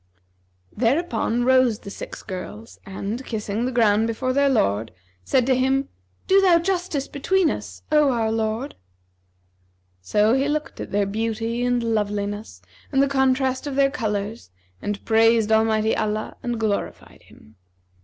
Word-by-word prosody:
Thereupon 240 -1 0
rose 255 -3 +4
the 200 - -10
six - - -8
girls 210 +3 -8
and, 200 +6 -5
kissing 215 -1 -3
the - - -2
ground 220 -2 +3
before 255 +3 -1
their 280 +1 +3
lord, 110 - +1 0.3
said 255 - +2
to 260 0 +3
him, 265 +2 +1 0.4
'Do 390 +1 +5
thou 365 -3 +5
justice 350 -5 -1
between 365 +6 +1
us, 100 -3 -7
O 300 -2 +5
our 225 -3 0
lord!' 225 +4 -2 1.3
So 210 - +2
he 270 +2 +2
looked 300 +1 -3
at - - -6
their 205 0 +1
beauty 225 +3 -2
and 245 -1 +1
loveliness 205 - -2 0.3
and 270 - +1
the 275 - +4
contrast 265 0 +1
of 280 - -4
their 275 0 +3
colours 215 - -3 0.3
and 205 0 -4
praised 225 -1 +4
Almighty 220 0 +2
Allah 215 0 -2
and 240 -2 -3
glorified 215 -2 -3
Him. 110 -1 -20
230 Hz, 145 wpm, -23 LUFS, 210-265 Hz, 1.3 s, Do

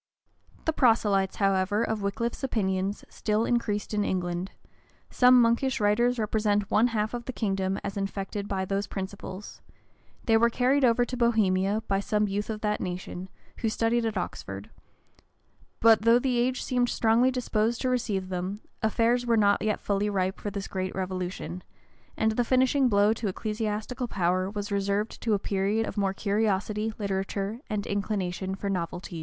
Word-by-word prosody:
[] - - -31
The 320 - +1
proselytes, 210 -8 +3
however, 195 +2 +1
of 220 -2 -2
Wickliffe's 230 +6 -2
opinions 195 -5 -1
still 215 +1 -1
increased 220 -4 -1
in 210 -1 +1
England:[] 180 -1 -2 0.6
some 250 0 +6
monkish 235 +2 +2
writers 235 +4 +2
represent 210 -2 0
one 225 +3 +4
half 220 -2 -1
of 240 -1 -4
the - - -3
kingdom 195 -4 -1
as 200 0 -4
infected 200 +1 -3
by 190 -2 -1
those 195 +1 -2
principles: 195 0 -7 0.6
they 225 -1 +4
were 235 +1 +4
carried 260 +4 +2
over 245 0 +4
to 250 - -5
Bohemia 215 -3 +2
by 195 -1 +1
some 210 +1 0
youth 205 +2 -3
of 215 -1 -4
that 210 -1 -1
nation, 180 0 -5 0.3
who 225 - 0
studied 230 +2 +1
at 220 -3 -1
Oxford: 100 - -5 1.1
but 225 -2 +6
though 230 +2 +5
the 250 -1 0
age 255 +1 0
seemed 245 -1 +1
strongly 230 +3 +3
disposed 235 -2 0
to 260 - 0
receive 210 -7 -1
them, 185 +2 -3 0.2
affairs 235 +3 +2
were 230 -1 +3
not 205 -1 +3
yet 215 -1 0
fully 205 +1 0
ripe 190 -1 -1
for 205 - -3
this 200 -1 -5
great 185 -1 -3
revolution; 185 -2 -4 0.6
and 220 0 +2
the 240 +3 +1
finishing 260 +2 +3
blow 205 0 +4
to 225 -1 -4
ecclesiastical 215 +4 -3
power 185 -1 0
was 205 0 -5
reserved 200 +2 -1
to 225 -3 +2
a - - +2
period 200 +3 0
of - - -6
more 195 -2 0
curiosity, 210 +1 0
literature, 195 +1 -2
and 210 -2 -2
inclination 190 -2 -2
for 200 - -5
novelties. 175 -2 -3
210 Hz, 165 wpm, -27 LUFS, 195-230 Hz, 1.1 s, some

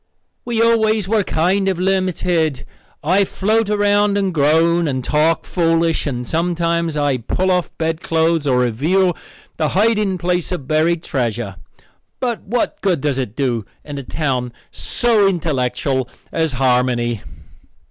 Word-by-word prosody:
"We 230 -2 +1
always 220 -3 +2
were 215 0 +2
kind 190 +4 +1
of 190 - -1
limited. 180 -6 0 0.4
I 185 +6 +3
float 215 +3 0
around 205 0 +2
and 195 -2 0
groan, 165 +3 +3
and 130 -3 -2
talk 155 +4 +1
foolish, 165 -2 +1
and 125 -3 -4
sometimes 170 -1 0
I 145 -3 +1
pull 185 +11 -1
off 180 -1 +1
bedclothes 160 -1 0
or 130 -2 +3
reveal 165 - +1 0.4
the 155 -2 0
hiding 210 -3 +2
place 180 0 -1
of 145 -8 -4
buried 160 +2 +1
treasure. 115 -6 -2 0.6
But 240 -3 -2
what 235 +5 -2
good 185 -6 +1
does 135 -1 -1
it 120 -5 -4
do 125 -6 -1 0.2
in 145 -2 -6
a - - -7
town 130 -4 -2 0.2
so 225 -4 +2
intellectual 135 -7 -1 0.2
as 160 -3 0
Harmony?" 125 -3 +1
165 Hz, 135 wpm, -19 LUFS, 135-190 Hz, 0.6 s, I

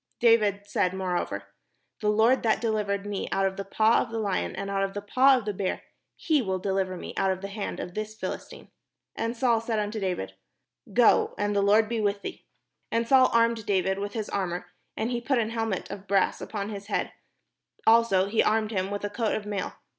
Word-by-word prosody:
David 215 -4 +4
said 185 -2 0
moreover, 175 - -3 0.5
"The 210 - 0
Lord 225 +5 +4
that 220 -2 +2
deHvered 210 -3 -1
me 205 -1 -3
out 195 - +1
of 190 0 -1
the 195 - -4
paw 220 +3 +3
of 240 - -4
the 225 - -4
Hon, 200 -3 -1
and 195 - -4
out 195 0 0
of 195 0 -2
the 205 - -3
paw 260 +5 +5
of 240 - -5
the 210 - -2
bear, 190 -1 -2 0.3
he 310 -4 +1
will 190 -4 -2
dehver 190 -1 -1
me - - -7
out 195 - +2
of 190 0 -1
the 195 - -5
hand 200 0 -5
of 180 - -6
this 215 +1 -5
Philistine." - - -7 0.4
And 230 +1 -2
Saul 235 -3 +2
said 225 -1 -2
unto 210 +1 -2
David: 180 - -3 0.3
" 125 - -61 0.2
Go, 240 +1 +4
and 205 0 0
the 200 - +3
Lord 210 +2 +4
be 230 0 -2
vdih 205 -1 0
thee." - - -7 0.5
And 230 0 0
Saul 260 0 +6
armed 230 -1 +2
David 190 -1 +1
with 205 0 -4
his 220 -3 -3
armour, 180 -3 -2 0.3
and 225 +3 -1
he 240 -1 -1
put 270 +2 +1
an 225 -1 0
helmet 225 -6 -2
of 200 0 -8
brass 195 -1 +2
upon 205 -1 -4
his 200 -2 -7
head; - - -2 0.7
also 225 -4 +5
he 210 +3 +2
armed 215 0 +1
him 190 -2 -1
with 205 0 -4
a - - -2
coat 220 +1 0
of 210 - -4
mail. 205 -1 -3
205 Hz, 220 wpm, -27 LUFS, 195-225 Hz, 0.7 s, Saul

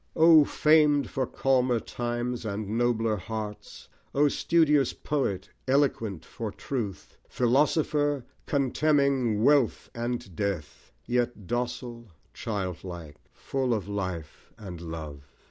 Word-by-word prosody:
O 160 -2 +8
framed 150 -1 +3
for 130 -2 -1
calmer 130 -3 +2
times 120 +1 -3
and 105 -1 -3
nobler 115 -2 +1
hearts! 105 +2 -7 0.3
O 145 +1 +4
studious 150 -4 +3
Poet, 100 -11 -2 0.2
eloquent 115 - +1
for 110 -3 -5
truth! 110 -5 -5
Philosopher! 145 +2 +2 0.2
contemning 140 -5 +2
wealth 140 -3 +3
and 120 -5 -4
death, 100 -7 -4
Yet 120 -3 -1
docile, 120 +1 -4 0.3
childlike, 90 -6 -5
full 130 -3 -1
of 100 -3 -4
Life 95 -6 -5
and 90 -5 -8
Love. 75 -4 -8
120 Hz, 105 wpm, -27 LUFS, 100-135 Hz, 0.3 s, O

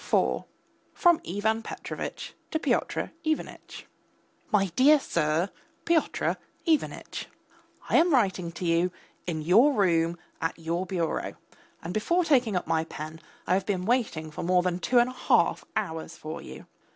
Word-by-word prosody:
IV - - +1 0.5
(FROM 345 -2 +4
IVAN 220 +5 0
PETROVITCH - - -6 0.2
TO - - 0
PYOTR - - 0
IVANITCH) 315 -1 -3 0.7
MY 205 -2 +4
DEAR 295 +3 +6
SIR, 165 - 0 0.3
PYOTR 335 -2 +1 0.3
IVANITCH! 320 -3 -1 0.6
I - - +4
am 340 +2 +5
writing 190 - +2
to 180 - -5
you, 170 +1 +3 0.4
in 160 -3 -2
your 225 - +6
room, 170 -6 +2 0.2
at 165 - -1
your 170 +3 -2
bureau; 175 -4 -2 0.5
and 170 +2 -4
before 345 - +1
taking 250 -9 +3
up 180 - 0
my 160 -1 +1
pen, 155 0 -8 0.2
I - - +2
have 190 0 +1
been 185 -3 -1
waiting 210 -10 0
for - - -6
more 180 +1 +3
than 180 -1 0
two 245 +6 +1
and 240 +1 +5
a - - -10
half 255 - +2
hours 165 -7 -3
for 155 +1 -6
you. - - -10
185 Hz, 150 wpm, -27 LUFS, 165-250 Hz, 0.7 s, DEAR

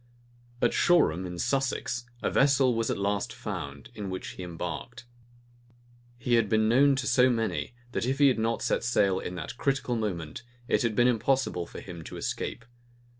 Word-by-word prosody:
At 120 - +3
Shoreham, 95 - +3
in 90 0 -6
Sussex, 125 0 -1 0.2
a - - +1
vessel 135 -2 +4
was 115 -1 0
at - - 0
last 100 +3 -1
found, 90 - -6
in 105 -4 -5
which 95 0 -5
he - - -9
embarked. 90 +8 -6 1.1
He 120 0 -1
had 115 -3 +4
been 110 0 +3
known 135 +4 +5
to 135 0 -2
so 130 -1 +4
many, 115 0 -1 0.2
that 120 - -1
if 135 +1 0
he 145 -1 +6
had 130 -4 +2
not 115 +1 0
set - - 0
sail 100 -6 +2
in 90 - -5
that 85 +7 -6
critical 135 -3 0
moment, 90 -9 -3 0.3
it - - +2
had 115 -3 0
been 120 +2 +5
impossible 120 -6 +1
for - - -9
him 85 -3 -9
to - - -7
escape. 120 - -4
115 Hz, 180 wpm, -28 LUFS, 95-125 Hz, 1.1 s, he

